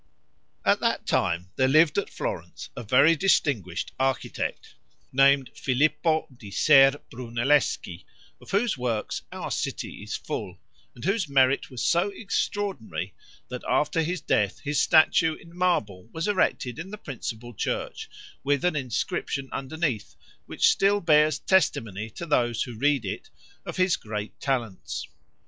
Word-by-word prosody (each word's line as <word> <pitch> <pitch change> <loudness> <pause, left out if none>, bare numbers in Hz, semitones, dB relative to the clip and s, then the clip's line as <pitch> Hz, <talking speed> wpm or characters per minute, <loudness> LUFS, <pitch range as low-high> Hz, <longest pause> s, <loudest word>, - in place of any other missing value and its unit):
At - - +4
that - - 0
time 90 +2 0
there 130 - +3
lived 155 +3 +5
at 200 - -4
Florence, - - -6
a - - -5
very 140 +8 +5
distinguished 140 - +1
architect, 135 -1 -2 0.4
named 135 0 +4
Filippo 155 +4 +1
di 110 -4 -11
Ser 135 +5 +5
Brunelleschi, 120 -5 0 0.4
of - - -15
whose 220 +5 +1
works 115 -4 -2
our - - -5
city - - -4
is - - -5
full, 90 0 -5 0.4
and 120 - -8
whose 195 -4 0
merit 135 -1 +3
was 125 -4 -5
so 175 +4 +2
extraordinary, 200 - -3 0.4
that - - -5
after 150 +2 +2
his 175 +3 -2
death 100 -1 +1
his 145 0 0
statue 160 0 +4
in 170 +1 -16
marble 115 - 0
was 165 +3 -3
erected 150 - 0
in 175 +4 -6
the 210 - -7
principal 120 - -7
church, 95 - -3 0.3
with 145 +2 +1
an 180 - +2
inscription 135 +1 -2
underneath, 130 - -3 0.3
which - - +2
still 200 +1 +3
bears 155 -4 +4
testimony 115 - +1
to 170 - -7
those 120 -7 +1
who 125 - -7
read 140 0 +1
it, 95 - -5 0.4
of - - -5
his 185 -1 +3
great 105 -1 -6
talents. 105 - -3
140 Hz, 140 wpm, -26 LUFS, 115-165 Hz, 0.4 s, lived